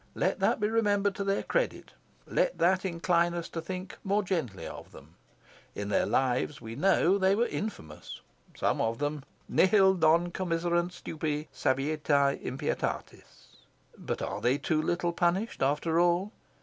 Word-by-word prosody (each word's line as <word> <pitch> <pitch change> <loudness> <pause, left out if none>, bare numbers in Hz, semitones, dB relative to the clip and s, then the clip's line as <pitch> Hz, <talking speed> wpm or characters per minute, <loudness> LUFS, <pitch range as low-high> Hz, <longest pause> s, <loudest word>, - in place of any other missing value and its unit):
Let - - 0
that - - +2
be 210 - +1
remembered 205 -3 +1
to 200 - -3
their 195 0 0
credit. - - -1 0.3
Let - - 0
that 185 +2 +2
incline 170 -1 +1
us 170 -1 -4
to 165 - -5
think 185 +2 -7
more 205 +1 +1
gently 160 - -3
of - - -9
them. 75 +4 -14 0.6
In 100 0 -4
their 105 - +2
lives 130 +2 0
we 115 -1 -8
know, 190 +4 +3
they 190 +1 +3
were 235 +3 +2
infamous, 80 - -6 0.4
some - - +1
of 115 0 0
them 145 0 -2 0.2
"nihil 190 0 +5
non 170 0 +3
commiserunt 175 -1 0
stupri, 155 -3 -4
saevitiae, 140 0 +1
impietatis." 135 +4 -5 0.4
But - - -4
are - - -4
they 125 +3 +2
too 155 +1 0
little 175 +1 -1
punished, 180 +6 0
after 150 +4 +1
all? 175 +4 +2
170 Hz, 150 wpm, -29 LUFS, 145-190 Hz, 0.6 s, nihil